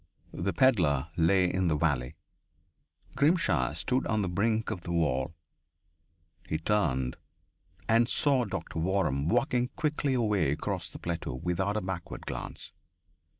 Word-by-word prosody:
The 95 Hz, +3 st, -1 dB
pedlar 80 Hz, -, +3 dB
lay 90 Hz, +3 st, +4 dB
in 95 Hz, +1 st, +1 dB
the 75 Hz, -2 st, +2 dB
valley. 70 Hz, -6 st, 0 dB, 1.0 s
Grimshaw 160 Hz, +6 st, +2 dB
stood 130 Hz, 0 st, -1 dB
on 110 Hz, -2 st, +1 dB
the -, -, -1 dB
brink 110 Hz, +5 st, 0 dB
of 90 Hz, -, -4 dB
the 85 Hz, -, -6 dB
"wall." 80 Hz, -2 st, 0 dB, 1.1 s
He 80 Hz, -, 0 dB
turned, 75 Hz, -9 st, 0 dB, 0.7 s
and 115 Hz, +1 st, +4 dB
saw 135 Hz, -4 st, +3 dB
Doctor 95 Hz, -5 st, -5 dB
Waram 80 Hz, -6 st, 0 dB
walking 125 Hz, +6 st, +1 dB
quickly 150 Hz, -3 st, 0 dB
away 105 Hz, -, +2 dB
across -, -, -3 dB
the -, -, -9 dB
plateau 85 Hz, -7 st, -4 dB
without 95 Hz, +8 st, -1 dB
a -, -, -1 dB
backward 95 Hz, -2 st, -5 dB
glance. -, -, -6 dB
95 Hz, 135 wpm, -29 LUFS, 80-115 Hz, 1.1 s, lay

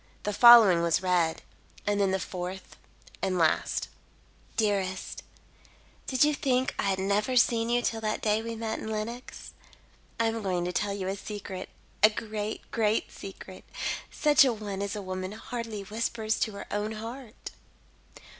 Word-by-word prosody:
The 210 Hz, -, -2 dB
following 220 Hz, -6 st, +8 dB
was 170 Hz, +1 st, +1 dB
read, 175 Hz, -3 st, +1 dB, 0.4 s
and 205 Hz, 0 st, +1 dB
then 195 Hz, -, +3 dB
the 190 Hz, -, +1 dB
fourth 185 Hz, +1 st, -6 dB, 0.5 s
and 190 Hz, -1 st, 0 dB
last: 160 Hz, -2 st, +1 dB, 0.7 s
"Dearest: 195 Hz, -3 st, -1 dB, 0.9 s
"Did 260 Hz, 0 st, +3 dB
you 300 Hz, 0 st, +4 dB
think 260 Hz, -2 st, +1 dB
I -, -, +1 dB
had 190 Hz, -, +1 dB
never 200 Hz, +6 st, 0 dB
seen 235 Hz, -1 st, +3 dB
you 240 Hz, 0 st, +2 dB
till 225 Hz, -1 st, -1 dB
that 215 Hz, -1 st, -1 dB
day 215 Hz, 0 st, +2 dB
we 230 Hz, 0 st, -5 dB
met 220 Hz, 0 st, -3 dB
in 220 Hz, -, -6 dB
Lenox? 220 Hz, +3 st, -5 dB, 0.7 s
I 230 Hz, -, +3 dB
am 225 Hz, 0 st, -1 dB
going 180 Hz, -3 st, -1 dB
to 180 Hz, -, -3 dB
tell 200 Hz, +2 st, 0 dB
you 195 Hz, -2 st, -4 dB
a 195 Hz, -, -1 dB
secret 200 Hz, -2 st, -7 dB, 0.3 s
a 215 Hz, -, +9 dB
great, 215 Hz, 0 st, -4 dB
great 220 Hz, -1 st, +1 dB
secret 190 Hz, -1 st, -10 dB, 0.5 s
such 295 Hz, -2 st, +5 dB
a 260 Hz, -, +3 dB
one 205 Hz, -3 st, -5 dB
as 200 Hz, +1 st, -2 dB
a 205 Hz, -, -5 dB
woman 185 Hz, +1 st, -4 dB
hardly 225 Hz, -1 st, -5 dB
whispers 220 Hz, +1 st, -2 dB
to 220 Hz, -, 0 dB
her 200 Hz, -, -7 dB
own 210 Hz, +1 st, -2 dB
heart. 230 Hz, +2 st, -8 dB
210 Hz, 165 wpm, -28 LUFS, 190-230 Hz, 0.9 s, a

